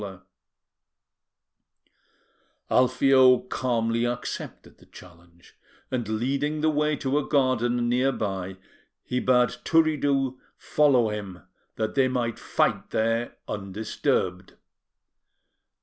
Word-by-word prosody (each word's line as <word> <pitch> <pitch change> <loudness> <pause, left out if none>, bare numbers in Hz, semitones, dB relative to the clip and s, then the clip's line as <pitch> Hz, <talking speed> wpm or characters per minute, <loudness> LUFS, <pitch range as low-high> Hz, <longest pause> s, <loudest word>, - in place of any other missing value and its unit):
Alfio 130 0 +5
calmly 115 -2 -1
accepted 120 0 -5
the - - -20
challenge, 85 -1 -17 0.4
and, 120 -4 -2
leading 140 +7 -1
the 155 0 +2
way 150 0 +1
to 140 +1 0
a 145 - -5
garden 120 -3 +1
near 125 +3 +2
by, 95 -5 -4 0.5
he 125 - -2
bade 125 -1 +3
Turiddu 145 -5 +1 0.2
follow 130 -7 +2
him, 95 -6 -7 0.3
that 110 -1 -2
they 135 -1 +3
might 120 -3 -2
fight - - 0
there 115 +2 -1
undisturbed. 95 -2 -2
125 Hz, 95 wpm, -25 LUFS, 110-135 Hz, 0.5 s, Alfio